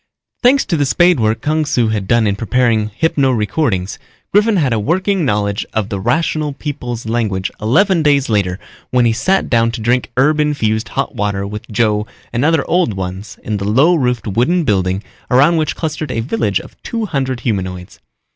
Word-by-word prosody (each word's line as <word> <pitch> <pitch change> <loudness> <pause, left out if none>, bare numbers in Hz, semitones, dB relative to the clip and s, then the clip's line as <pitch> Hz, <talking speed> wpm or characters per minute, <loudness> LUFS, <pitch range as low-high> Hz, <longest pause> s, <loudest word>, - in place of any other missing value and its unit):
Thanks 265 +3 +4
to 175 - -1
the 145 -2 +1
spade 175 +1 +3
work 110 0 0
Kung 155 +3 0
Su 120 -6 +1
had 105 -3 -2
done 115 +1 +3
in 100 -1 +1
preparing 110 0 +1
hypno 140 +3 +1
recordings, 105 - -1 0.3
Griffin 210 +2 +4
had 140 -9 +1
a 110 - 0
working 185 - 0
knowledge 105 -3 0
of 110 -1 -1
the 100 -3 -3
Rational 155 - 0
People's 125 -6 -5
language 110 -5 -1
eleven 170 - +3
days 145 -2 +3
later 100 -5 0 0.3
when 125 -1 +2
he 115 - +3
sat 190 +12 +1
down 115 -1 +2
to 120 - -4
drink 120 +3 0
herb 150 +4 +3
infused 115 -8 0
hot - - -2
water 100 -1 -2
with 105 +1 -7
Joe 105 -1 +1 0.3
and 120 +2 0
other 160 -2 +2
Old 175 - +1
Ones 95 +2 -6
in 105 -1 -2
the 100 +1 -3
low 140 +11 +4
roofed 125 - 0
wooden 125 - +1
building 95 -4 0 0.3
around 145 +7 +4
which 155 -1 -1
clustered 155 -2 -4
a 115 - -2
village 145 - -1
of - - -14
two 230 -2 -3
hundred 130 - -2
humanoids. 95 -5 -4
120 Hz, 185 wpm, -16 LUFS, 105-155 Hz, 0.3 s, Thanks